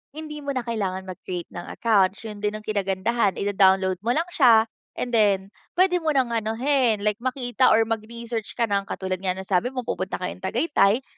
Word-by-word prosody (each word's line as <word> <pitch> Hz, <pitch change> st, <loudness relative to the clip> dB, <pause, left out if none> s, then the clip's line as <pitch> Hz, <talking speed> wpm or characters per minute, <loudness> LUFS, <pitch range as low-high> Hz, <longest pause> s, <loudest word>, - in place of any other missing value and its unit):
Hindi 305 Hz, -1 st, -7 dB
mo 280 Hz, -1 st, -4 dB
na 255 Hz, -, -1 dB
kailangan 200 Hz, -5 st, -3 dB
mag-create 180 Hz, -1 st, -6 dB
ng 175 Hz, -, -8 dB
account 200 Hz, -4 st, +2 dB
'yun 210 Hz, -2 st, -7 dB
din 210 Hz, 0 st, -1 dB
ang 215 Hz, -, -7 dB
kinagandahan 200 Hz, +1 st, 0 dB
ida-download 190 Hz, -2 st, +2 dB
mo 230 Hz, +5 st, 0 dB
lang 330 Hz, +3 st, 0 dB
siya 235 Hz, -8 st, +6 dB, 0.3 s
and 245 Hz, -, -3 dB
then 200 Hz, -3 st, +2 dB, 0.2 s
puwede 360 Hz, 0 st, +3 dB
mo 320 Hz, -2 st, -1 dB
nang 255 Hz, -3 st, +2 dB
anuhin 230 Hz, 0 st, +1 dB
like 210 Hz, +1 st, 0 dB
makita 255 Hz, 0 st, +1 dB
or 225 Hz, -, +5 dB
mag-research 225 Hz, 0 st, -5 dB
ka 235 Hz, -, 0 dB
ng 200 Hz, -2 st, -1 dB
katulad 185 Hz, -1 st, -3 dB
nga 185 Hz, -1 st, 0 dB
nasabi 190 Hz, +3 st, 0 dB
mo 255 Hz, -1 st, -4 dB
pupunta 185 Hz, -3 st, -3 dB
kayong 185 Hz, -, -5 dB
Tagaytay, 225 Hz, -, +2 dB
220 Hz, 185 wpm, -24 LUFS, 195-245 Hz, 0.3 s, siya